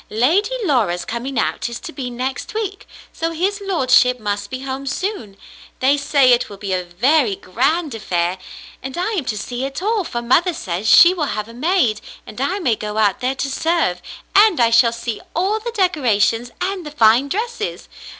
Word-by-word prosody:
"Lady 335 - +1
Laura's 215 - +1
coming 245 +3 -4
out 225 - -1
is 235 - -6
to 355 - -8
be 255 -4 -5
next 255 - -5
week, 405 -3 -4 0.3
so 330 - -2
his 380 +5 -2
lordship 255 -9 +3
must 205 -1 -3
be 255 +3 -6
home 270 +1 -5
soon. 265 - -4 0.4
They 270 +2 +3
say 280 -2 +3
it 245 - +1
will 200 - -10
be 195 -1 -4
a 180 -1 -1
very 220 - +1
grand 275 - -1
affair! 180 -4 -2 0.4
And 265 +3 -7
I 365 +5 -1
am 365 -11 -2
to 215 - -2
see 245 +5 -4
it 275 +1 -4
all, 420 +2 0
for 240 -7 -5
mother 330 +9 +2
says 185 +3 -4
she 345 +1 +8
will 330 -5 -1
have 210 0 -3
a 230 - -12
maid, 255 - +1 0.2
and 230 - -8
I 360 +8 0
may 290 - +1
go 210 0 -5
out 205 -3 +2
there 255 +2 -1
to 275 - -2
serve, 320 - 0 0.3
and 410 -5 +5
I 230 -1 +4
shall 230 0 +5
see 235 -1 -5
all 390 +6 +1
the 460 +2 -5
decorations 250 - +1
and 380 0 -2
the 300 - -7
fine 245 -1 +3
dresses. 440 - -4
260 Hz, 195 wpm, -19 LUFS, 225-350 Hz, 0.4 s, she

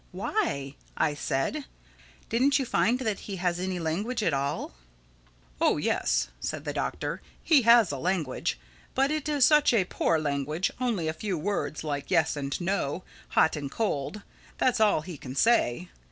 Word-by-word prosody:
"Why?" 180 - -2 0.2
I 150 - +2
said. 145 - -2 0.6
"Didn't 270 +5 +3
you 270 - -1
find 240 0 +2
that 220 -6 -1
he 200 - -6
has 175 -1 -1
any 185 0 -2
language 200 +9 -2
at 165 - +2
all?" 140 - -2 0.9
"Oh - - +4
yes," - - +1
said 155 - -4
the 145 - -2
Doctor, - - -3 0.2
"he 305 -5 +5
has 230 -7 +7
a 140 - -4
language. 165 -5 -1 0.4
But 270 +2 +2
it 305 -1 -2
is 290 -4 +4
such 300 -2 +5
a 195 -5 +3
poor 165 - +1
language—only 160 - -1
a 155 - 0
few 185 +2 -3
words, 175 -3 -2
like 145 -2 -3
'yes' 160 - +2
and 140 -1 -3
'no'—'hot' 175 -2 0
and 145 -2 -4
'cold.' 200 0 -2 0.3
That's 250 -2 +2
all 210 -7 +4
he 165 -2 -8
can 130 0 -8
say. 180 - +2
180 Hz, 160 wpm, -28 LUFS, 145-230 Hz, 0.9 s, has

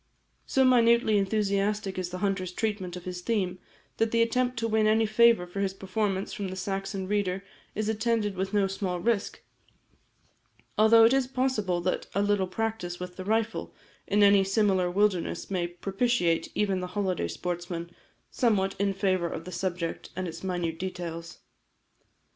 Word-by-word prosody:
So 265 -1 +3
minutely 235 -3 +4
enthusiastic 200 -1 0
is 180 -1 -3
the 180 - -5
hunter's 190 -2 -1
treatment 195 -3 -3
of 180 - -9
his 180 -1 -5
theme, 185 -4 -1 0.4
that 225 - +2
the 230 +1 +3
attempt 250 +1 0
to 230 0 0
win 220 -1 +2
any 220 +1 +4
favour 225 -3 +4
for 180 +3 -7
his 195 -1 -1
performance 195 0 -2
from 205 -4 -4
the 185 - -5
Saxon 195 0 -3
reader, 195 -2 -1 0.3
is 215 0 -1
attended 220 -2 0
with 190 +1 -2
no 205 -2 +3
small 190 -2 -2
risk, 215 +2 -1 1.3
although 225 +1 +6
it 230 - +5
is 270 -2 +2
possible 255 -9 0
that 185 +1 -1
a 200 - +2
little 205 -2 +1
practice 185 -3 -3
with 180 0 -7
the 185 - -7
rifle 220 +1 -1 0.3
in 205 +1 +3
any 200 -1 +6
similar 195 -2 +2
wilderness 195 -1 0
may 180 -2 0
propitiate 185 0 0
even 195 -3 +1
the 180 - -4
holiday 185 - 0
sportsman 175 - -4 0.4
somewhat 200 -6 +1
in 200 -1 +1
favour 185 -3 +1
of 165 - -6
the 180 - -7
subject 175 -2 -3
and 185 0 -3
its 165 +1 -8
minute 175 -3 -2
details. 170 -2 -6
195 Hz, 165 wpm, -28 LUFS, 180-215 Hz, 1.3 s, although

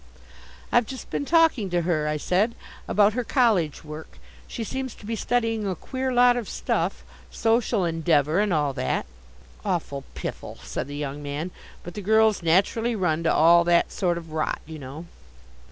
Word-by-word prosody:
"I've 240 -2 +3
just 260 +2 -8
been 285 - -2
talking 320 - +3
to 175 -1 0
her," 160 -3 0
I 150 0 0
said, 195 +9 +1 0.3
"about 205 0 +4
her 250 +2 -1
college 215 - +2
work. 155 0 -9 0.3
She 230 - -5
seems 260 +2 -4
to - - -14
be 225 +2 -2
studying 225 -2 0
a 190 - -1
queer 260 - -3
lot 245 0 +5
of 240 -4 -4
stuff - - -1 0.3
Social 225 -3 +1
Endeavour 165 -1 +2
and 210 -1 +1
all 150 -4 +1
that!" 130 -1 -1 0.6
"Awful 165 -8 -2
piffle," - - -6
said - - -4
the 145 0 -6
young 145 0 -4
man. 145 +5 -4 0.3
"But 175 - -8
the 210 - -6
girls 220 +1 +3
naturally 200 +8 +2
run 170 -5 0
to - - +4
all 170 +2 +6
that 170 0 +3
sort 175 -2 0
of 165 -2 -9
rot, 155 0 -1
you 160 0 -9
know." 140 +5 -8
180 Hz, 175 wpm, -25 LUFS, 155-225 Hz, 0.6 s, all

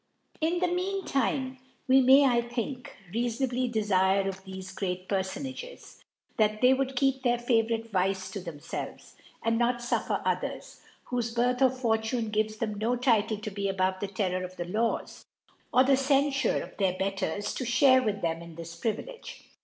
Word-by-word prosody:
In 330 +3 +1
the 360 +1 +1
mean 370 +2 -2
time 265 -1 -1 0.3
we 265 +1 +6
may, 265 +2 +7
I 240 -3 +4
think, 245 +3 -5 0.2
rea 235 +2 +1
fonably 250 +1 -1
defirc 195 -3 +2
of 190 0 -5
thefe 190 0 -8
great 185 -1 -3
Pcrlbhages^ 260 - -4 0.4
that 215 -1 +2
they 255 +2 +6
would 265 0 -1
keep 270 0 +2
their 245 -2 +2
favourite 230 -1 0
Vice 190 0 0
to 200 - -4
thimfelves, 165 -5 -7 0.3
and 230 0 +1
not 240 +1 +3
fuffer 240 0 -1
others, - - -3 0.3
whofe 240 -2 -2
Birtii 245 +2 +1
or 260 - +7
Fortune 230 -2 -1
gives 215 0 0
them 215 -2 -3
no 230 +3 +1
Title 225 -4 +2
to 215 +1 -6
be 200 0 -2
above 185 -1 0
the 200 - -2
Terrour 185 -2 -1
of 185 0 -8
the 175 - -3
Laws, 220 +6 -2 0.5
or 255 - +6
the 275 +1 +4
Ccnfure 275 -1 +2
of - - -12
their 185 -2 +1
Betters, 195 +1 -2
to - - -3
(hare 255 +2 +5
with 205 -5 -2
them 165 0 -1
in 170 -1 -11
this 170 0 -8
Privilege. 230 - -5
230 Hz, 175 wpm, -28 LUFS, 195-260 Hz, 0.5 s, may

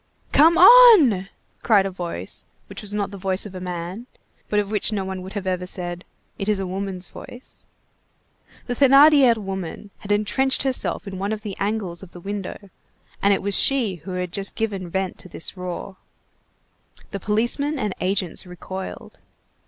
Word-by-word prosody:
"Come 325 +4 +5
on!" 365 - +8 0.3
cried 205 -4 +4
a 195 - -3
voice 170 - -5 0.2
which - - -9
was 210 - -7
not 205 -1 -2
the 200 - -9
voice 190 +1 +1
of 205 - -9
a 185 - -6
man, 180 +6 -6 0.4
but 210 - +2
of 205 0 -2
which 215 +1 0
no 200 -3 -2
one 190 -1 -5
would 190 +3 -7
ever 195 -1 -5
have 180 0 -3
said: 175 -1 -5 0.3
"It 195 - -2
is 210 - +2
a 195 - -3
woman's 185 -1 -4
voice." 245 +2 -12 1.0
The 245 - -2
Thénardier 275 -1 +6
woman 195 -1 -6
had 205 - -6
entrenched 260 +7 +1
herself 260 -5 -1
in 190 -1 -6
one 200 +2 -2
of 215 -1 -3
the 205 -3 -5
angles 200 -4 -2
of 190 -2 -13
the 175 - -10
window, 200 +1 -7 0.5
and 200 - +3
it 195 - +1
was 200 0 +2
she 240 -9 +3
who 185 +4 -8
had 180 -1 -3
just 195 0 -3
given 200 -5 -3
vent 190 +1 -3
to 185 - -8
this 165 - -6
roar. 180 +1 -6 1.1
The 200 - -4
policemen 240 +9 0
and 210 -7 -2
agents 185 -1 -2
recoiled. 185 +2 -8
195 Hz, 175 wpm, -22 LUFS, 185-220 Hz, 1.1 s, on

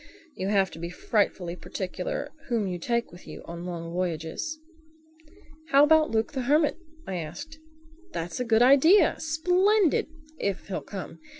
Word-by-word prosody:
You 190 - -4
have 195 -2 +2
to 160 - -10
be 170 +1 -4
frightfully 180 -2 -1
particular 185 +10 -5 0.2
whom 230 -4 0
you 180 -2 -3
take 235 +6 -1
with 175 +1 -14
you - - -9
on 170 +1 -7
long 170 -1 -5
voyages." 180 - -3 1.1
"How 280 -1 +6
about 315 +1 +5
Luke 220 0 0
the 270 -3 -3
Hermit?" 295 +4 +2 0.3
I 190 - -4
asked. 175 - -7 0.5
"That's 170 - -4
a - - +1
good 230 -1 +4
idea—splendid—if 320 - +3
he'll 195 - -3
come. 195 -3 -8
225 Hz, 140 wpm, -27 LUFS, -, 1.1 s, How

